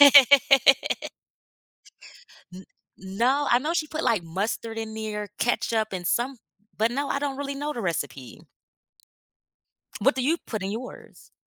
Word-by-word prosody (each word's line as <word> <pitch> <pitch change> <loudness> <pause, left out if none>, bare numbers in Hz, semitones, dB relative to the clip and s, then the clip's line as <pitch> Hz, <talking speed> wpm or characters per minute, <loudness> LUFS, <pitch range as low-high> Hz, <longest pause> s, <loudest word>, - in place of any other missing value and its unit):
N 275 -1 +6 1.9
no, 245 +9 0
I 240 - +5
know 300 +6 -2
she 330 -3 0
put, 315 +1 -4
like, 215 -6 +2
mustard 205 +6 -4
in 220 -1 -5
there, 210 -1 -5
ketchup, 225 -2 0
and 180 -2 -4
some 255 +3 0 0.4
but 220 +2 +1
no, 280 +3 -2
I - - -1
don't 280 -1 -3
really 280 0 -4
know 290 +2 -3
the 235 - -4
recipe. 140 -8 -4 1.6
What 270 +7 +3
do 260 - -1
you 325 +5 +2
put 215 -4 -4
in 195 - -3
yours? 235 +4 -10
240 Hz, 140 wpm, -25 LUFS, 210-280 Hz, 1.9 s, N